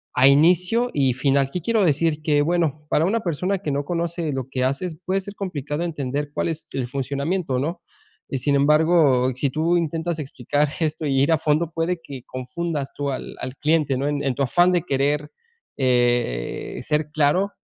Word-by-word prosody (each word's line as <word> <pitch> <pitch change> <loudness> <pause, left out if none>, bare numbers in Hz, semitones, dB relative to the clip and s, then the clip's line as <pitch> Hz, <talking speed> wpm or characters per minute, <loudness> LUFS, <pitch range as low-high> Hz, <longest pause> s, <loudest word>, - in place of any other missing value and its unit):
a 130 +1 +6
inicio 180 - +4
y 135 -3 +2
final. 135 +1 +1
¿Qué 180 - -3
quiero 225 +2 +2
decir? 155 0 +1
Que 145 -2 +3
bueno, 155 -3 0
para 160 - +2
una 225 +5 +1
persona 180 +3 -1
que 150 -6 -3
no 140 +1 -1
conoce 170 -2 -2
lo 130 -1 -3
que 130 -2 -1
haces, 155 +5 -2
puede 190 +1 0
ser 200 +1 -9
complicado 150 -4 -3
entender 145 -3 -3
cuál - - -1
es 160 -1 -5
el 130 -3 -1
funcionamiento, 140 +3 -2
¿no? 170 +5 -3 0.5
Y 135 - -2
sin 140 +3 +1
embargo, 145 -3 +4
si 135 +1 0
tú 165 +5 +1
intentas 165 0 -2
explicar 145 +1 -1
esto 155 0 -1
y 135 -2 +1
ir 145 - +3
a 160 - +4
fondo, 155 +2 +1
puede 165 +2 -1
que 135 -5 -8
confundas 140 +3 -4
tú 145 -1 -3
al 130 - -6
al 130 +1 -5
cliente, 150 -4 +1
¿no? 140 +2 -1
En 145 -1 -1
en 135 -3 0
tu - - -3
afán 175 +8 +3
de 175 - +3
querer, 145 0 0 0.5
eh, 120 - 0
ser 150 0 -1
claro, 155 +7 +2
150 Hz, 190 wpm, -23 LUFS, 135-170 Hz, 0.5 s, a